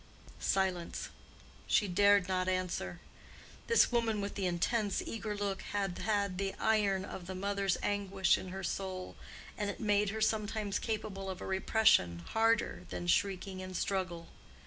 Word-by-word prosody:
Silence. 185 -3 -1 0.6
She 210 - +3
dared 200 +1 +4
not 185 -1 0
answer. 185 -1 -2 0.7
This 465 - +5
woman 230 -3 +1
with 200 0 -3
the 195 -2 -1
intense, 200 +4 0
eager 215 -2 -4
look 200 -1 -2
had 195 -3 -2
had 200 -3 0
the 195 -1 -1
iron 205 -3 +2
of 180 -3 -8
the 190 - -5
mother's 200 0 0
anguish 195 -2 +2
in - - -5
her 190 +1 -6
soul, 185 0 -4 0.4
and 205 -1 0
it 200 - -4
had - - -5
made 205 -1 +3
her 220 +2 -3
sometimes 215 -1 0
capable 210 -3 -3
of 185 -1 -5
a - - -6
repression 190 - +3
harder 225 - +2
than 90 -1 -4
shrieking 190 - 0
and 185 -1 -5
struggle. 180 -4 -2
195 Hz, 155 wpm, -33 LUFS, 185-210 Hz, 0.7 s, This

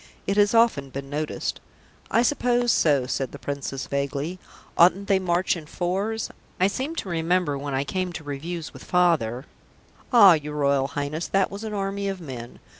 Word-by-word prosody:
"It 195 - 0
has 205 +2 +4
often 225 -13 +3
been 135 +1 -7
noticed." 150 +1 -3 0.5
"I 230 - +3
suppose 245 -2 +2
so," 145 -9 +3
said 130 0 -2
the - - -6
Princess 135 0 -4
vaguely. 140 +5 -3 0.4
"Oughtn't 185 +3 +4
they 195 -1 +3
to - - -7
march 180 +1 +1
in 160 -3 -9
fours? 195 +7 -2 0.3
I 185 - +4
seem 260 +11 -2
to 205 - -4
remember, 170 -2 +1
when 140 0 -4
I 135 - +1
came 185 +5 -2
to 160 - -7
reviews 155 +4 -5
with - - -11
Father 155 -9 +1 0.3
" - - -30
"Ah, 205 -7 +9
your 150 -1 -3
Royal 140 -2 +2
Highness, 145 +4 -3
that 195 -1 +1
was 200 +2 -7
an 215 -1 -4
army 200 0 -2
of 195 -1 -4
men. 125 -7 -8
170 Hz, 190 wpm, -25 LUFS, 140-195 Hz, 0.5 s, Ah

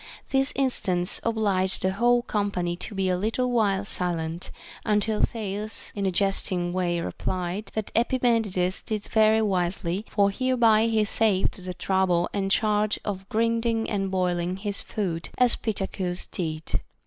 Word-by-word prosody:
This 270 0 +2
instance 185 -10 0
obliged 200 -5 0
the 190 - +2
whole 240 +4 +3
company 200 -6 -1
to 180 +3 -6
be 190 -1 0
a 185 - +2
little 225 +6 0
while 205 -4 +2
silent, 170 -3 -3 0.3
until 210 0 +1
Thales 215 -1 -3
in 200 -1 0
a - - +1
jesting 180 -2 0
way 175 -2 0
replied, 180 +3 -3
that 215 -1 -3
Epimen 235 -1 +2
ides 185 -1 0
did 215 -2 -3
very 220 0 +3
wisely, 185 0 -1
for 200 -1 +3
hereby 230 -2 +3
he 220 -2 +2
saved 200 -3 +1
the 180 0 -5
trouble 185 -2 +1
and 195 -1 -1
charge 210 0 +2
of 195 -1 -4
grinding 230 0 +1
and 195 -2 0
boiling 180 -1 0
his 200 0 -3
food, 175 -6 -3
as 250 -1 +5
Pittacus 190 -4 -3
did. 160 -3 -3
200 Hz, 150 wpm, -26 LUFS, 180-220 Hz, 0.3 s, as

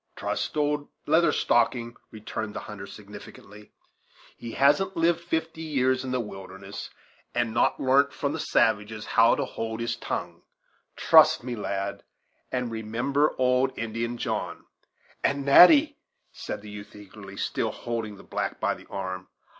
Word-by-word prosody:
"Trust - - -3
old 145 -1 0 0.2
Leather 160 +1 +4
Stocking," 120 -2 +1
returned 110 0 -6
the - - -4
hunter 100 -2 -8
significantly; 105 0 -12 0.6
"he 115 -1 -8
hasn't 170 +8 +3
lived 165 0 +3
fifty 160 -1 -3
years 130 -4 +1
in 130 - -5
the 130 0 0
wilderness, 95 -2 -8 0.5
and 120 -2 0
not 120 - +2
larnt 135 +2 +3
from 140 0 -2
the 160 - -4
savages 110 -4 +1
how 115 +1 +4
to - - -1
hold 110 0 -5
his 115 0 -1
tongue - - -5 0.5
trust - - +6
to - - -15
me, 125 - -3
lad; 100 -2 -3 0.5
and 125 -2 -2
remember 120 +7 0
old 130 +1 +2
Indian 115 +1 -3
John." - - -3 0.6
"And, 140 -1 0
Natty," 285 - +7 0.3
said 105 - -6
the 105 - -9
youth 105 0 -10
eagerly, 100 -1 -12
still - - -1
holding 115 -3 -5
the - - -14
black - - -3
by - - +1
the - - -13
arm. 95 -1 -5
120 Hz, 150 wpm, -26 LUFS, 105-140 Hz, 0.6 s, Natty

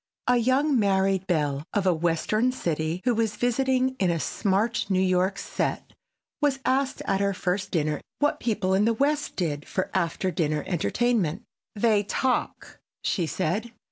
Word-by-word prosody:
A 250 - +4
young 260 +3 +2
married 195 -2 +2
belle 145 -5 0
of 200 -2 +1
a 185 - +4
western 175 +9 +1
city 165 -5 -2
who 250 - +3
was 220 -2 0
visiting 260 +1 +1
in 185 - +2
a 170 -1 0
smart 215 +7 0
New 190 -1 +2
York 185 +1 +2
set - - -3 0.5
was 290 -2 +2
asked 265 +1 0
at 195 -1 +1
her 200 -1 +1
first 190 +2 -1
dinner 155 -4 -1 0.2
what 290 0 +1
people 205 -5 0
in 195 +2 +3
the 230 0 +2
West 290 +4 0
did 150 -5 -2
for 185 - -2
after 185 +1 0
dinner 155 -4 -1
entertainment. 195 +1 0 0.3
"They 215 -1 +3
talk," 250 +5 -2 0.2
she 175 -5 0
said. 210 +11 -2
195 Hz, 160 wpm, -26 LUFS, 175-240 Hz, 0.5 s, A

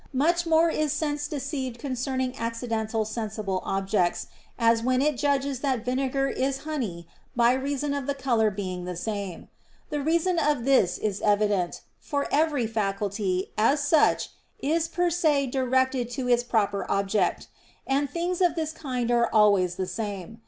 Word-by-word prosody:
Much 340 +5 +2
more 325 +1 +5
is 305 -2 0
sense 295 -1 -1
deceived 275 -4 -4
concerning 260 0 -2
accidental 230 -1 -2
sensible 215 -3 -3
objects, 195 -2 0 0.3
as 230 -1 +3
when 255 +2 +1
it 295 +1 +2
judges 280 0 0
that 260 -4 -1
vinegar 270 +2 0
is 270 0 -2
honey 225 - -4 0.3
by 240 0 +4
reason 280 +2 -1
of 280 -2 -3
the 280 - 0
color 240 -5 +2
being 185 -3 -5
the 180 0 -4
same. 200 -1 -4 0.4
The 295 -1 -1
reason 335 +4 +1
of 290 -7 +1
this 255 -10 +3
is 205 -2 -2
evident; 205 -3 +1 0.2
for 285 -2 -2
every 295 -4 +2
faculty, 200 -3 -1
as 270 +7 +4
such, 310 0 +3 0.3
is 320 +3 0
per 350 +1 0
se 310 -5 +2
directed 260 -1 +1
to 255 -2 -2
its 240 -1 +4
proper 205 -5 0
object; 195 -1 0 0.4
and 275 +1 0
things 350 +3 -2
of 350 -3 +3
this 315 -2 -2
kind 255 -6 -3
are 235 0 +3
always 200 -5 +4
the 190 0 -2
same. 205 +2 -5
250 Hz, 155 wpm, -26 LUFS, 210-285 Hz, 0.4 s, more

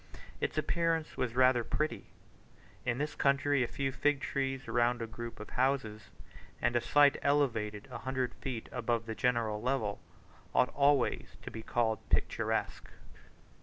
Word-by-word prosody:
Its - - -2
appearance 165 -2 0
was 120 -2 -2
rather 125 -1 +5
pretty. 115 -5 -2 0.8
In 120 -1 +1
this 150 +2 -2
country 140 0 +2
a - - -1
few 135 +2 -2
fig 140 +2 +1
trees 135 -2 -2
round 120 +1 +2
a 115 - -2
group 115 +1 -8
of 105 - -9
houses, 125 -5 0 0.5
and 120 - +1
a 120 - +3
site 145 +2 +5
elevated 115 -8 +1
a - - -5
hundred 130 -2 -2
feet 125 -4 -5
above 120 -1 -1
the 110 - -4
general 115 -3 0
level, 120 -5 -1 0.6
ought 125 - +4
always 140 -2 +2
to - - -7
be 110 - -6
called 110 -2 0
picturesque. - - 0
125 Hz, 150 wpm, -32 LUFS, 115-140 Hz, 0.8 s, rather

